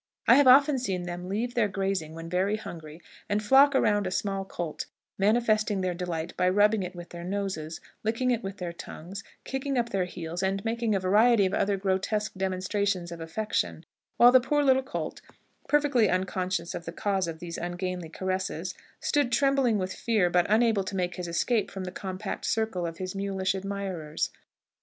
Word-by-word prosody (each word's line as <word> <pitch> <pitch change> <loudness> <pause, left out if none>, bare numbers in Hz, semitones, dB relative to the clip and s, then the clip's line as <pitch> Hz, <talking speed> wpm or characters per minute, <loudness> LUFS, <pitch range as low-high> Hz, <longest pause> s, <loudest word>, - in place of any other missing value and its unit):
I - - +9
have 285 -1 +6
often 275 +2 +7
seen 190 -7 -2
them 175 +1 -6
leave 230 +5 -2
their 235 -4 +2
grazing 190 -5 -2
when 165 0 -7
very 190 +5 +1
hungry, 165 -5 -9 0.3
and 210 +1 0
flock 275 +5 +6
around 205 -6 +3
a - - -1
small 195 +1 -2
colt, 175 -4 -5 0.3
manifesting 215 -1 +2
their 185 -1 0
delight 170 -2 -4
by 180 0 +2
rubbing 205 +2 +4
it 180 0 -5
with 175 0 -9
their 170 0 -8
noses, 185 -4 -3 0.2
licking 230 +4 +1
it 235 -2 0
with 195 -2 -6
their 175 -3 -4
tongues, 185 +3 -8 0.2
kicking 270 0 -2
up 235 -1 +1
their 190 -3 0
heels, 170 0 -5
and 195 +1 -1
making 225 -1 0
a - - +2
variety 205 +3 +4
of 190 - -1
other 200 0 +1
grotesque 195 +2 0
demonstrations 190 -1 -1
of 170 -1 -7
affection, 210 +7 -2 0.3
while 240 +1 +8
the 255 0 +7
poor 295 +3 +1
little 265 -1 +4
colt, 260 - -5 0.5
perfectly 285 -8 +3
unconscious 185 -1 -1
of 170 - -6
the 165 - -5
cause 190 0 -1
of 165 -1 -5
these 170 0 -6
ungainly 175 -1 -4
caresses, 185 +2 -3 0.3
stood 290 -5 +1
trembling 270 -2 +3
with 185 -1 -2
fear, 210 -7 +1
but 175 0 +3
unable 220 -2 +3
to 190 +1 -5
make 180 -2 -1
his 180 -1 -4
escape 210 +6 +1
from 190 - -6
the 180 - -5
compact 190 +2 -5
circle 220 -6 0
of 165 0 -7
his 185 0 -4
mulish 195 -1 -1
admirers. 190 -5 -3
195 Hz, 185 wpm, -28 LUFS, 180-220 Hz, 0.5 s, I